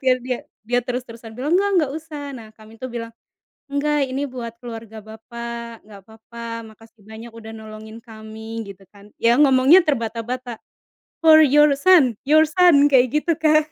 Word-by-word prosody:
iya 260 -2 +3
biar - - -11
dia 250 -1 -3 0.3
dia 245 +1 +1
terus-terusan 235 -2 -7
bilang 285 +6 -3
enggak 370 -7 +1
usah 300 -3 -8
nah 230 -4 -10
kami 220 +1 -17
tuh 255 - -5
bilang, 230 -1 -7 0.6
"Enggak 290 0 0
ini 280 +2 -2
buat 245 -3 -7
keluarga 225 -2 -9
bapak 235 +1 -9
enggak 205 -1 -14
apa-apa 225 +1 -13 0.2
makasih 220 0 -19
banyak 225 +2 -11
udah 225 -1 -11
nolongin 220 0 -11
kami" 220 0 -9
gitu 195 0 -12
kan 205 0 -19
ya 235 +3 +2
ngomongnya 275 +4 +6
terbata-bata, 240 -1 -3 0.7
"for 315 -1 +8
your 295 0 +5
son 330 -9 +5 0.2
your 310 +1 +6
son" 315 -3 +4
kayak 255 -1 +5
gitu 335 +3 +1
kan 310 -1 +3
240 Hz, 160 wpm, -21 LUFS, 225-285 Hz, 0.7 s, for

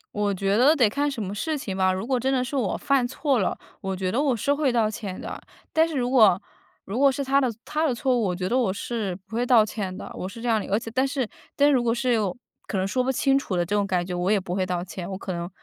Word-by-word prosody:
我 205 -1 +1
觉 195 +1 0
得 270 +8 +5
得 250 -8 +4
看 285 +7 0
什 270 -5 -4
么 195 0 -4
事 305 +9 -2
情 205 -8 -5
吧。 190 0 +3
如 190 +3 -3
果 255 0 0
真 265 +3 0
的 255 -2 +1
是 255 - -5
我 235 -9 0
犯 275 -3 +2
错 270 0 0
了， 190 - 0 0.2
我 190 0 -2
觉 185 0 -2
得 250 - +1
我 280 -4 +2
是 280 +7 +1
会 285 -2 +1
道 230 -3 +2
歉 205 -3 -6
的。 - - -7 0.3
但 320 +1 +4
是 320 - -5
如 245 -1 0
果 215 -8 +6 0.5
如 215 +7 -3
果 280 -1 +6
是 280 +1 -3
她 275 +1 +3
的 255 -3 +1
她 305 +1 -1
的 255 - 0
错 255 +1 +1
误， 240 - +1
我 180 -2 0
觉 185 +1 -2
得 240 - 0
我 245 -7 +2
是 200 -1 -3
不 220 - -9
会 240 - +1
道 240 -3 +5
歉 200 -4 -4
的， - - -8
我 185 - -5
是 230 - -10
这 240 - -4
样 225 -2 +2
的， - - -7
而 200 - +4
且 225 - -8
但 260 +1 +2
是 265 -3 -2 0.3
但 285 +1 +4
如 255 - +3
果 235 - +2
是 245 0 +1 0.5
可 200 - -2
能 190 +1 0
说 255 +5 0
不 260 - +1
清 270 +1 +2
楚 205 -8 -4
的 175 - +1
这 205 - -1
种 200 -1 +1
感 180 -2 0
觉， 180 - -5
我 180 +1 -1
也 210 -1 +4
不 180 -1 -5
会 190 0 0
道 180 -1 -2
歉。 180 0 -7
我 190 - -4
可 190 -1 -5
能 170 +1 -4
230 Hz, 325 characters per minute, -25 LUFS, 190-265 Hz, 0.5 s, 果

